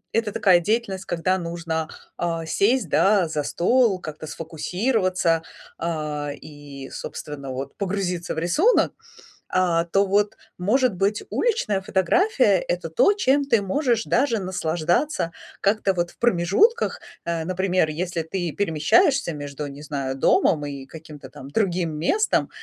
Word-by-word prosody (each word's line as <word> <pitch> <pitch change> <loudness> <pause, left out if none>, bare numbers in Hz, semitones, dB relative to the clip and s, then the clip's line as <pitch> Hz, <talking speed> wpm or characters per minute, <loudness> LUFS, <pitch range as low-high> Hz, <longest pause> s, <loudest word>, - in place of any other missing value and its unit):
Это 225 -2 0
такая 180 -3 +4
деятельность, 195 -1 -1
когда 180 +2 0
нужно, 165 -2 -3 0.3
а, 165 -1 -2
сесть, 235 +10 +2
да, 195 -4 +3
за 150 -2 -2
стол, 215 - +2
как-то 155 -2 -7
сфокусироваться, 180 - 0 0.4
а, 150 -3 -3
и, 145 -3 -11
собственно, 140 -2 -7
вот, 135 +2 -6
погрузиться 185 -3 -2
в - - -7
рисунок, 300 - +3 0.6
а, 175 -2 +1
то 195 +3 +2
вот, 205 +1 +2 0.2
может 220 +4 +2
быть, 200 +3 0
уличная 410 - 0
фотография 280 - +2
это - - -3
то, 440 -4 +4
чем 285 -8 +2
ты 230 -6 +3
можешь 235 +2 0
даже 245 -3 +1
наслаждаться 175 - -1 0.3
как-то 200 -1 +2
вот 175 -1 -1
в - - -20
промежутках, 240 - +2 0.3
э, 165 -1 -1
например, 185 -2 +1
если 170 +1 -3
ты 175 0 -3
перемещаешься 205 - +2
между, 145 0 -6
не 140 +2 -10
знаю, 140 -3 -3
домом 145 +2 +3
и 140 -2 -7
каким-то 155 -4 -11
там 135 +1 -11
другим 180 -3 0
местом, 410 - +1
180 Hz, 135 wpm, -23 LUFS, 160-210 Hz, 0.6 s, такая